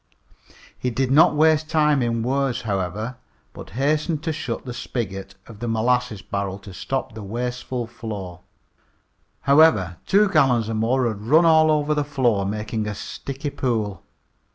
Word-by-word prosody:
He 125 - -2
did 130 +2 -1
not 150 +2 +6
waste 155 0 +3
time 150 -3 +3
in 115 -1 0
words, 135 0 0
however, 105 +3 -3 0.4
but - - -10
hastened 150 +3 0
to 160 -2 -1
shut 130 -6 -4
the 125 - -5
spigot 95 -6 -5
of 110 -3 -13
the 120 - -4
molasses 115 -1 0
barrel 100 -1 -3
to 100 -1 -12
stop 135 +6 -3
the 110 - -8
wasteful 120 +3 -4
flow. 105 -6 -7 1.0
However, 140 - +4
two 210 +2 +5
gallons 130 - +2
or - - -2
more 120 +3 +1
had 105 -3 -4
run 155 +10 +4
all 160 -1 +5
over, 150 0 +2
the 150 -1 0
floor, 120 -9 +1
making 105 +1 -3
a 105 - -3
sticky 140 +7 -6
pool. 110 -9 -2
120 Hz, 155 wpm, -23 LUFS, 110-145 Hz, 1.0 s, not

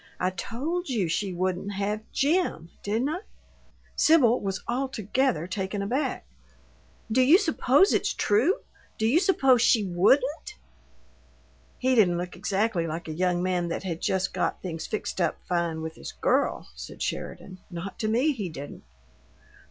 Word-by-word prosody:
I 185 0 +1
told 295 - -3
you 215 -9 0
she 190 +4 -1
wouldn't 185 +2 -2
have 205 +2 -2
JIM, 280 - 0
didn't 225 +7 0
I?" 330 +4 -2 0.8
Sibyl 260 -7 +5
was 195 -1 -3
altogether 250 - 0
taken 190 +2 -3
aback. 260 +6 -2 0.9
"Do 255 +4 +4
you 285 +8 +7
supose 335 - +3
it's - - +1
true? 240 - +2 0.4
Do 220 - 0
you 260 +9 +4
suppose 270 - +4
she 225 -2 +4
WOULDN'T?" 250 - +2 1.2
"He 260 +1 +1
didn't 190 -8 +4
look 180 +1 -5
exactly 195 -4 0
like 165 +1 -5
a 155 - -4
young 180 +1 0
man 180 -2 0
that 170 - -3
had 170 -3 -4
just 190 0 0
got - - -1
things 165 -3 -5
fixed 215 -3 -3
up 170 - +1
fine 170 -2 -1
with 160 0 -5
his - - -9
girl," - - 0
said - - -7
Sheridan. 185 -1 -5
"Not 175 +2 -7
to 215 - -1
me, 245 +8 +2
he 205 -8 -4
didn't!" 145 -2 -8
205 Hz, 150 wpm, -26 LUFS, 180-260 Hz, 1.2 s, you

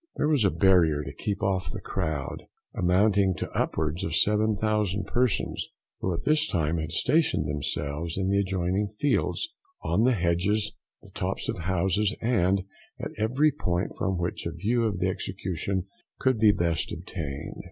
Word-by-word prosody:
There 150 - +1
was 150 -6 +3
a 100 - +5
barrier 85 -8 +4
to - - -7
keep 100 -1 -3
off 95 -1 0
the 110 - -5
crowd, 80 -8 -3 0.3
amounting 95 +1 +3
to - - -5
upwards 80 +2 -1
of 80 - -1
7,000 105 -1 +2
persons, 120 +1 0 0.3
who 95 - -1
at 85 0 -3
this 155 +1 +3
time 80 -1 0
had 80 0 -4
stationed 155 - +2
themselves 75 +3 -2
in 95 -1 0
the 100 +1 +2
adjoining 95 +1 0
fields, 140 - 0 0.3
on - - +1
the 130 +1 +4
hedges, 100 +3 +1 0.3
the - - -15
tops - - -3
of - - -2
houses, 95 +4 +1
and 100 -5 +2 0.4
at - - -4
every 130 +8 +3
point 90 -9 -2
from 95 -1 -1
which 85 -1 -2
a - - -3
view 110 +8 0
of 105 -4 -1
the 90 +1 0
execution 95 0 -2 0.3
could 130 -4 +1
be 110 -1 +6
best 85 -5 0
obtained. 80 -5 -6
95 Hz, 165 wpm, -27 LUFS, 85-105 Hz, 0.4 s, be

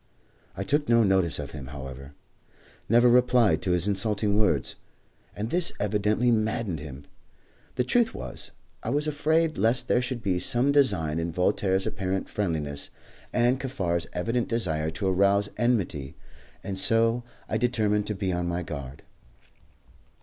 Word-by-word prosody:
I 95 - -2
took 145 +6 0
no 115 -1 +5
notice 95 -4 +2
of 70 -1 -6
him, 70 -4 -8
however 70 0 -9 0.7
never 120 +2 +5
replied 125 -2 +4
to - - -2
his 90 +2 +3
insulting 105 +1 0
words; 105 - +1 0.6
and 110 +3 -4
this 175 -1 +4
evidently 105 +3 +1
maddened 110 -6 -1
him. 70 -2 -9 0.7
The 125 - +1
truth 230 - +2
was, - - -7 0.3
I - - -4
was 145 +1 +1
afraid 155 +2 +1
lest 115 +3 +2
there 125 - +2
should 125 -2 -4
be 90 -3 0
some 120 +9 +2
design 100 - +2
in 85 +1 -2
Voltaire's 95 +2 +1
apparent 95 0 -3
friendliness 75 -8 -3 0.4
and 125 +2 +2
Kaffar's 95 -11 -2
evident 115 +7 -1
desire 80 -10 0
to 80 +4 -3
arouse 100 +2 +2
enmity, 100 - -1 0.5
and 95 -1 -3
so 115 +3 +3 0.3
I 110 - -1
determined 105 -4 +1
to 105 - -2
be 95 -2 -2
on 90 0 -2
my 85 +1 -2
guard. 70 -4 -7
105 Hz, 150 wpm, -26 LUFS, 85-120 Hz, 0.7 s, no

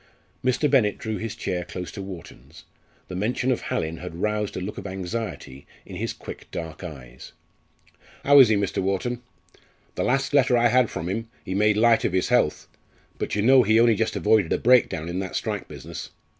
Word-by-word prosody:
Mr. 130 +4 +2
Bennett 120 -8 +3
drew 110 -1 -4
his 110 -1 -5
chair 90 -1 -3
close 90 0 -7
to 100 - -7
Wharton's. 95 -4 -11 0.4
The 90 - -7
mention 120 +6 0
of 125 - -1
Hallin 80 +1 -3
had 90 -1 -8
roused 105 +3 -2
a - - -1
look 95 +3 -5
of 100 - -7
anxiety 95 - -6 0.2
in - - -9
his - - -2
quick - - -10
dark 80 +1 -7
eyes. 65 -7 -10 0.9
"How 145 0 +7
is 130 -5 +8
he, 110 - +4
Mr. 100 -2 -1
Wharton? 100 +6 -2 0.7
The - - -2
last 135 +2 0
letter 130 -3 +4
I 120 0 +4
had 125 -1 +3
from 80 - -5
him 115 +5 -3 0.2
he 95 - -4
made 105 +1 +3
light 115 +1 +4
of - - 0
his 95 +3 +1
health. 120 -11 +1 0.5
But - - -2
you 105 - 0
know 130 +2 +7
he 110 0 +3
only 115 0 +5
just 110 +1 -1
avoided 105 -5 +2
a - - +3
breakdown 110 -9 +3
in 85 +2 -3
that 95 -1 -5
strike - - -3
business. - - -8
105 Hz, 200 wpm, -24 LUFS, 90-120 Hz, 0.9 s, is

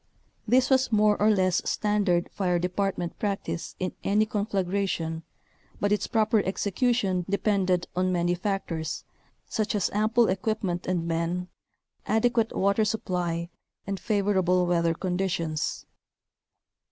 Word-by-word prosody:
This 255 +4 +3
was 260 -2 +3
more 210 -1 +4
or 210 - +5
less 185 -4 +2
standard 205 -5 +1
fire 180 -3 0
department 180 0 -2
practice 195 -6 -3
in 185 - -3
any 210 +2 +3
conflagration 195 -5 -1 0.6
but 205 - 0
its 210 - +1
proper 220 -1 +2
execution 200 -1 0
depended 190 -3 +1
on 185 +1 +1
many 175 0 +1
factors, 175 -4 -3 0.4
such 215 -1 -1
as 200 - 0
ample 220 +3 +3
equipment 190 -2 -1
and 175 -2 -1
men, 170 +2 -1 0.6
adequate 225 0 +2
water 200 +3 +2
supply, 175 -5 -2 0.3
and 195 -1 -3
favorable 190 -4 +2
weather 170 -1 +1
conditions. 175 -4 -2
195 Hz, 115 wpm, -27 LUFS, 175-210 Hz, 0.6 s, or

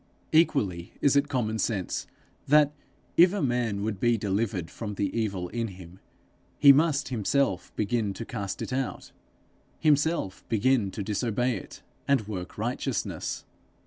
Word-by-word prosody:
Equally 100 - +2
is 140 -1 +3
it 140 +1 +3
common 110 -5 -1
sense 95 -3 -2 0.4
that, 150 0 +5 0.5
if 175 +2 +7
a 205 - -1
man 120 -6 0
would 105 -3 -2
be 120 +1 +3
delivered 100 -3 -1
from 105 -3 -5
the 100 -1 -2
evil 100 -6 -1
in 115 +3 -2
him, 90 -2 -12 0.6
he 140 - +9
must 145 -2 +2
himself 120 -4 0
begin 105 0 0
to 115 - -6
cast 100 -5 -4
it - - -5
out, 130 0 -3 0.7
himself 150 - +1
begin 115 -1 +2
to 100 +1 -5
disobey 115 +4 0
it, 95 - -9 0.2
and 135 -7 +2
work 95 -4 -6
righteousness. - - -3
115 Hz, 145 wpm, -27 LUFS, 100-135 Hz, 0.7 s, he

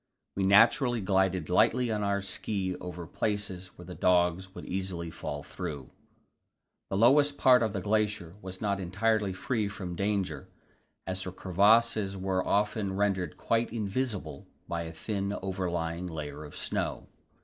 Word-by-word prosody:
We 95 - +1
naturally 115 +5 +5
glided 95 -4 +1
lightly 115 +6 +3
on 105 -1 -1
our 100 -1 0
ski 95 0 -2
over 90 -1 -7
places 95 0 -2
where 90 - -10
the 90 - -8
dogs 90 +1 +2
would - - -8
easily 90 -3 -3
fall 75 -2 -5
through. 70 -4 -6 1.0
This 95 - -1
lowest 145 +5 +5
part 125 -2 +6
of 110 -2 +1
the 100 -2 -3
glacier 105 -4 0
was 95 0 -8
not 100 -2 0
entirely 100 +3 +1
free 105 +3 -1
from 95 -3 -6
danger, 100 -1 -1 0.6
as 95 +1 -3
the 90 - -5
crevasses 100 +2 +3
were 95 -1 0
often 105 -1 0
rendered 95 -5 0
quite 115 0 0
invisible 105 - -3 0.2
by 85 -1 -2
a 80 - -6
thin 100 +3 -3
overlying 90 -2 -2
layer 75 -2 -6
of 75 - -11
snow. - - -3
95 Hz, 150 wpm, -29 LUFS, 90-105 Hz, 1.0 s, part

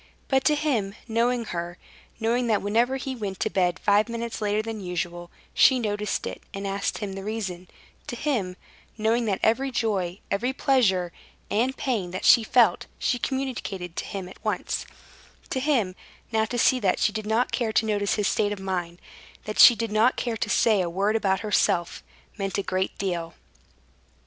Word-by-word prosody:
But 265 -1 +3
to 300 - +4
him, 240 -10 -1
knowing 235 +1 +1
her, 175 -2 -5 0.4
knowing 235 +2 +1
that 215 -4 +1
whenever 235 +6 +2
he 265 0 -4
went 200 -5 -5
to - - 0
bed 180 -1 +1
five 205 +4 +2
minutes 235 -1 -4
later 210 +1 0
than 220 -1 -5
usual, 175 -1 -4 0.2
she 260 - +6
noticed 210 -3 -2
it, - - -6
and 195 0 -5
asked 195 0 -2
him 205 -3 -4
the 195 0 -6
reason; 195 -4 -4 0.4
to - - -4
him, 230 -10 -1 0.4
knowing 230 +2 +1
that 200 -3 0
every 260 +5 +2
joy, 200 -8 -1
every 245 +6 0
pleasure 195 -11 +2 0.4
and 250 +5 +1
pain 225 -10 -1
that 185 +1 -5
she 235 - +7
felt 235 +1 +3
she 245 - 0
communicated 225 -10 -3
to - - -2
him 195 -2 -5
at 185 - -14
once; - - -2 0.6
to 260 - 0
him, 255 -10 +1 0.4
now 220 -1 +2
to 245 +3 -4
see 255 +2 +4
that 190 -5 +1
she 215 - +2
did 215 -1 -4
not 225 +3 +1
care 230 -3 0
to 220 - +2
notice 205 -2 0
his 210 -2 0
state 205 -1 +1
of 205 - -4
mind, 180 -3 -3 0.4
that 215 - -5
she 240 - +10
did 225 0 -3
not 220 +4 +3
care 235 -2 -2
to 215 -1 -3
say 215 -2 +3
a 175 - -1
word 200 +5 0
about 195 -4 +1
herself, 180 -5 +1 0.4
meant 195 -1 -2
a 200 - -1
great 185 0 -2
deal. 175 -4 -3
215 Hz, 185 wpm, -25 LUFS, 190-235 Hz, 0.6 s, she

